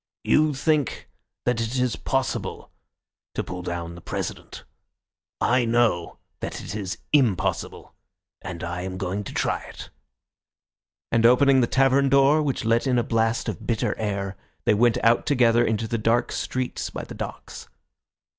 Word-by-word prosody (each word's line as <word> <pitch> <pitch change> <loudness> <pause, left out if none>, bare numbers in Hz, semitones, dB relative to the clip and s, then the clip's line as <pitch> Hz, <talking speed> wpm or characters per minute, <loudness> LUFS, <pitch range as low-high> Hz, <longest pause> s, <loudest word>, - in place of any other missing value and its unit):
You 150 -1 +3
think 150 -1 0 0.3
that 125 -2 +1
it 115 +3 -2
is 125 -3 +1
possible - - -2 0.6
to - - -1
pull 90 0 -6
down 85 -1 -4
the 85 - -11
President. - - -5 0.8
I 125 +1 +3
know 115 -7 +1 0.2
that - - -5
it - - -7
is 100 -4 -4 0.2
impossible, 125 -11 +1 0.5
and 90 -3 -7
I 85 +1 -3
am 95 0 -5
going 95 +2 -3
to - - -6
try - - 0
it," - - -11 1.2
and 115 -1 +3
opening 130 +3 +6
the 120 - +2
tavern 135 +1 +3
door, 140 +3 +5
which 135 -6 -2
let 115 +4 +2
in 125 -1 +2
a 120 - +2
blast 115 0 0
of 105 -7 -5
bitter 115 -2 0
air, 100 -2 -2 0.3
they - - +4
went 115 +2 +3
out 115 +1 +3
together 120 -4 +4
into 110 0 0
the 115 0 -2
dark 115 +2 +1
streets 130 -1 -3
by - - -6
the - - -9
docks. - - -8
115 Hz, 155 wpm, -24 LUFS, 100-130 Hz, 1.2 s, opening